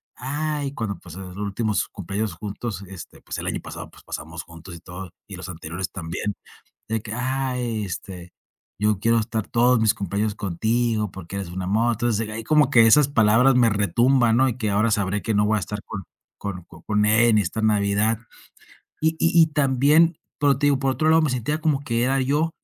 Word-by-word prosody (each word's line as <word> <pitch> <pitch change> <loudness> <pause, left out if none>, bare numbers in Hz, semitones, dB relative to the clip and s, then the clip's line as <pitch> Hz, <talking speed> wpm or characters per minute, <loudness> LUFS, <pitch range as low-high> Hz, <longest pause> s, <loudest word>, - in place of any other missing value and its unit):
"Ay", 145 +1 -3
cuando, 105 -8 -4
pues, 90 -1 -12
los 95 -1 -8
últimos 105 +1 -1
cumpleaños 100 +1 -4
juntos, 100 +1 -5
este, 95 -2 -11
pues, - - -6
el - - -5
año - - -2
pasado, - - -8
pues, - - -18
pasamos 80 +2 -7
juntos 85 +1 -11
y - - -10
todo 90 +3 -9 0.2
y 100 - -8
los 95 0 -8
anteriores 85 +1 -5
también 95 +3 -4 0.5
de 110 -1 -1
que: 105 - -9
"Ah, 130 +1 -2
este, 95 -6 -5 0.5
yo 105 -1 +1
quiero 115 +2 +3
estar 110 -1 -3
todos 120 0 +3
mis 110 -1 +3
cumpleaños 100 +2 -2
contigo 110 +3 -1
porque 95 0 -9
eres 95 -3 -5
un 90 +2 -5
amor". 110 +6 +1
Entonces 115 -1 -1
ahí, 110 +1 -5
como 150 +2 +3
que 115 -4 +7
esas 145 +4 +6
palabras 115 +1 +4
me 120 -2 +5
retumban, 115 +4 +3
¿no?, 130 +1 +4
y 120 - -5
que 110 -4 -1
ahora 105 +3 +2
sabré 100 -1 0
que 110 - -1
no 105 0 +3
voy 110 +1 +2
a - - 0
estar 105 +1 -5
con 100 -3 -6 0.4
con 95 -3 -5 0.2
con 105 -1 +2
ella 110 +3 +4
en 110 - +4
esta 105 +3 -2
Navidad. 105 +1 +2 0.8
Y 160 0 +2
y 165 0 +5
y - - +5
también 150 +3 +3 0.2
pero 140 -3 +3
te 145 - +1
digo, 140 -2 +3
por 135 -1 +1
otro 155 +4 0
lado, 160 0 +5
me 155 - +1
sentía 130 +5 -2
como 155 -4 +1
que 115 -4 0
era 135 +1 +1
yo. 145 +5 +1
110 Hz, 205 wpm, -23 LUFS, 100-130 Hz, 0.8 s, que